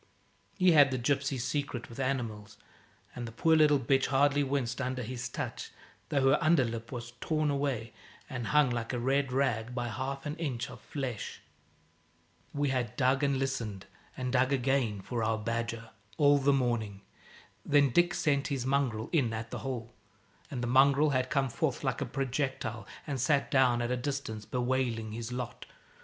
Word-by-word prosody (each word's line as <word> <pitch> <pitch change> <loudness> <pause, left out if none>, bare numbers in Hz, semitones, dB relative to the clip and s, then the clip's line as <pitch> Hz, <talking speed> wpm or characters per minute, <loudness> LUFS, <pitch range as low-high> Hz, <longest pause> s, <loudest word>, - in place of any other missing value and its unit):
He 185 -2 +5
had 145 -3 +7
the 130 - -1
gypsy's 135 0 0
secret 140 -4 -3
with 115 - -11
animals, 120 -6 -3 0.6
and 120 -1 -5
the - - -7
poor 160 +8 +3
little 150 -2 +5
bitch 135 +1 +2
hardly 145 +1 +3
winced 135 -2 -1
under 130 -1 -2
his 125 +1 -5
touch, - - -5 0.4
though 135 -1 +3
her 145 - +2
under 155 -4 +4
lip 115 -1 -5
was 120 -2 -6
torn 155 -2 +1
away, 135 -6 -2 0.3
and 120 -3 -4
hung, 150 -2 +4
like 120 0 -3
a 125 - -1
red 135 +2 +1
rag, 125 -3 0
by 120 -1 -2
half 135 +4 -4
an 150 +1 -4
inch 135 -5 -3
of 125 - -11
flesh. 130 -7 -5 1.1
We 145 -1 0
had 125 -4 -1
dug 135 +1 +2
and 140 -1 +2
listened 115 -7 -3 0.3
and 125 0 -3
dug 130 +1 +3
again 130 -6 +1
for 115 +3 -3
our 110 0 +1
badger, 115 +1 -3 0.3
all 145 -1 +5
the 140 +1 +3
morning. 120 -7 0 0.6
Then 145 -2 +4
Dick 175 +4 +3
sent 140 -3 +1
his 135 -4 -2
mongrel 130 -5 0
in 135 -9 +2
at 110 0 -5
the - - -4
hole, 120 -3 -5 0.6
and 125 -3 -4
the - - -1
mongrel 140 +4 +5
had 130 -1 0
come 135 0 +1
forth - - -1
like - - -1
a - - -1
projectile 130 -5 -2 0.2
and 140 -4 -3
sat 140 +2 +2
down 125 -3 +4
at 120 - -2
a 125 - +1
distance, 125 -5 -4
bewailing 125 -3 -1
his 115 +2 -5
lot. 125 -1 -5
130 Hz, 175 wpm, -30 LUFS, 120-140 Hz, 1.1 s, had